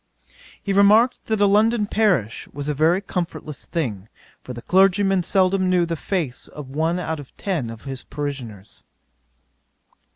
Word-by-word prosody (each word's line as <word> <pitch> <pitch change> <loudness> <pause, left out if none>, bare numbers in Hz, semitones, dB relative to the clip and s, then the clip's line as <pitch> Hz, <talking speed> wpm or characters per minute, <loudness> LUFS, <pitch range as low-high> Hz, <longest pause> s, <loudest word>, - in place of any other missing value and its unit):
'He 200 - -1
remarked, 210 +5 +4
that 220 -2 0
a - - +6
London 210 +2 +3
parish 185 - 0
was 145 +1 -6
a 150 - 0
very 160 +6 +2
comfortless 165 -6 -5
thing; 110 - -3 0.3
for - - -8
the 120 -1 -8
clergyman 195 0 +3
seldom 185 +1 +2
knew 180 -1 +3
the 170 0 -2
face 160 -6 -3
of 145 -3 -10
one 160 +4 0
out 160 -3 -3
of 140 - -13
ten 165 - -2
of 115 -1 -9
his 135 -2 -6
parishioners. 125 -9 -6
170 Hz, 155 wpm, -22 LUFS, 140-195 Hz, 0.3 s, a